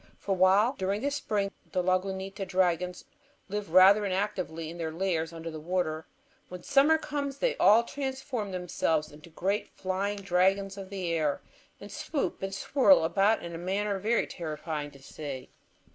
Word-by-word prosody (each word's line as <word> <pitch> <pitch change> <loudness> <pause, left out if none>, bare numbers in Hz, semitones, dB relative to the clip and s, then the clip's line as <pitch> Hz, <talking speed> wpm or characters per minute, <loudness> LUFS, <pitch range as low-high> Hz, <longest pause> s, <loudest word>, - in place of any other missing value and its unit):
For 195 - -2
while 195 +7 +4
during 195 +2 -1
the 285 +2 0
spring 210 -8 -1 0.2
the 180 -1 +1
Lagunita 190 +2 -1
dragons 180 -1 0 0.4
live 205 -3 -4
rather 190 +4 +7
inactively 185 -5 -2
in 170 - -10
their 160 -1 -2
lairs 165 -2 -1
under 165 0 -7
the 155 - -7
water, 160 -1 -2 0.4
when 180 -1 -8
summer 285 +4 +4
comes 285 -3 -4
they - - 0
all 220 +3 +6
transform 265 -5 -4
themselves 170 -4 -1
into 150 +3 -14
great 195 +5 -2
flying 195 +2 -2
dragons 195 +1 +1
of 195 -1 -8
the 185 -4 -3
air, 155 -3 0 0.4
and 200 0 -10
swoop 285 +7 -3
and 195 0 -3
swirl 275 - +4
about 195 +6 +2
in 170 0 -6
a 165 - -5
manner 195 +3 -1
very 225 +4 +1
terrifying 155 -2 -5
to 140 - -16
see. 135 -3 -7
190 Hz, 160 wpm, -29 LUFS, 170-205 Hz, 0.4 s, rather